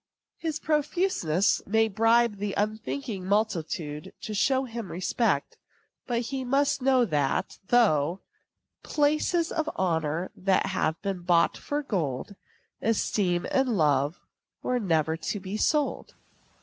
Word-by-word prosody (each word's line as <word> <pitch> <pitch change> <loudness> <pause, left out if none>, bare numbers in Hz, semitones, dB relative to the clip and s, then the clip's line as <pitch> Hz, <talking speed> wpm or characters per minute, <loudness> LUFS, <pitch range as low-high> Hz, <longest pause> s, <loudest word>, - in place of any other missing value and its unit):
His 320 -2 -2
profuseness 300 - +1
may 220 +2 +3
bribe 225 +1 +3
the 200 0 -3
unthinking 215 0 -2
multitude 165 -7 -1
to 215 - -5
show 260 +6 +2
him 230 -5 -6
respect; 185 - 0 0.5
but 240 -2 0
he 265 +2 -4
must 275 +2 +1
know 260 -1 +4
that, 145 -8 -1
though 185 -8 +3 0.6
"Places 310 +3 +1
and 315 -1 -1
honors 165 -1 -1 0.2
have 185 -4 +1
been 195 -2 -2
bought 175 -1 +3
for 290 +1 -3
gold, 165 - -2 0.5
Esteem 195 -5 +1
and 255 -5 +2
love 145 0 +2 0.4
were 250 0 0
never 160 -6 +1
to 185 +5 -3
be 190 +2 -6
sold." 295 +6 0
210 Hz, 120 wpm, -27 LUFS, 170-255 Hz, 0.6 s, know